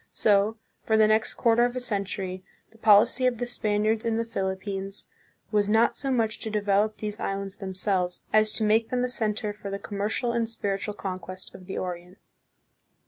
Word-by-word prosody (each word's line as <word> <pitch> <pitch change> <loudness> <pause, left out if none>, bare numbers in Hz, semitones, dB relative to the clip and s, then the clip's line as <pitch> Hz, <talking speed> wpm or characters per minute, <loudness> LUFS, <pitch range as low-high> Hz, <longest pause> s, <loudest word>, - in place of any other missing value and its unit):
So, 210 +1 +3 0.2
for 220 - +2
the 215 - +6
next 215 +1 +2
quarter 235 0 +3
of 245 +1 0
a - - -1
cen 210 -5 -2
tury, 185 -1 -5 0.3
the 225 - -21
policy 220 +4 +5
of 245 -2 0
the 245 - -2
Spaniards 215 -2 0
in 230 -1 0
the 230 - 0
Philippines 195 -1 -3 0.4
was 205 -1 +2
not 220 +2 +4
so 275 - -2
much 225 -4 +1
to 220 - -4
develop 210 0 +1
these 210 -1 -5
islands 195 0 -3
themselves, 190 -2 -1
as 215 0 +5
to - - +2
make 220 +2 +3
them 250 0 0
a - - +1
center 215 -3 -1
for 205 -1 -8
the 195 - -3
commercial 210 +4 -2
and 235 -1 0
spiritual 200 -2 -3
conquest 185 -1 -6
of 185 - -13
the 190 - -5
Orient. 180 +1 -5
210 Hz, 190 wpm, -26 LUFS, 195-225 Hz, 0.4 s, the